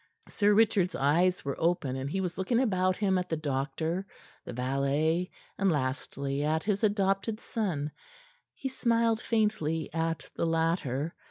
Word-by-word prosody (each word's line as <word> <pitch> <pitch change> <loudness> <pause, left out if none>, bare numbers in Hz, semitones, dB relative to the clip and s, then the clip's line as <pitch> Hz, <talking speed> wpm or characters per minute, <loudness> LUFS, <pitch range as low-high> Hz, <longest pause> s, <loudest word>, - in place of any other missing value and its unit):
Sir 205 -1 +3
Richard's 205 -5 +3
eyes 170 +6 +2
were 140 - -1
open, 160 -6 +1
and 135 +1 -3
he 190 +5 -1
was 180 -2 -3
looking 210 +6 +1
about 185 -7 +2
him 190 -3 +2
at 180 - -4
the 160 - 0
doctor, 155 +5 -2 0.4
the - - -6
valet, 140 +7 0 0.3
and, 195 -1 +3
lastly, 140 0 -2
at 155 +1 +1
his 205 0 0
adopted 200 +1 +1
son. 170 -13 -2 0.6
He 270 - -4
smiled 230 -3 +1
faintly 210 -10 0
at 165 0 -1
the 170 - 0
latter. 165 -3 0
170 Hz, 150 wpm, -29 LUFS, 145-200 Hz, 0.6 s, Sir